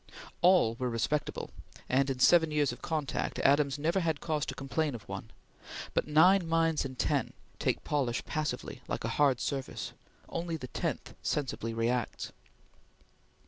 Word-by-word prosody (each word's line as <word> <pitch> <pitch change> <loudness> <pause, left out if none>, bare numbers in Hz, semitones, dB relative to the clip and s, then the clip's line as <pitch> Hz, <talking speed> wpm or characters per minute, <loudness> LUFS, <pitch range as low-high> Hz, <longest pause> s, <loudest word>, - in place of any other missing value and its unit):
All 175 -10 +5
were 125 -1 0
respectable, 120 +6 -1 0.4
and 135 +2 +2
in 135 - -1
seven 160 +5 +6
years 150 -3 +2
of 120 - -9
contact, 155 -4 -2
Adams 140 0 +3
never 165 +6 +1
had 160 -4 0
cause 155 -3 -1
to - - -4
complain 140 +1 -1
of 105 -7 -10
one; - - -6 0.6
but - - +1
nine 170 +4 +5
minds 165 -1 +2
in 130 -2 -6
ten - - 0 0.3
take - - 0
polish 130 -5 -1
passively, 155 -1 -3
like - - -3
a - - -1
hard 135 -4 +4
surface; 135 -2 -3 0.3
only 170 -1 -3
the 130 -4 -8
tenth - - -3
sensibly 130 -5 -2
reacts. 115 +1 -1
145 Hz, 150 wpm, -31 LUFS, 130-160 Hz, 0.6 s, seven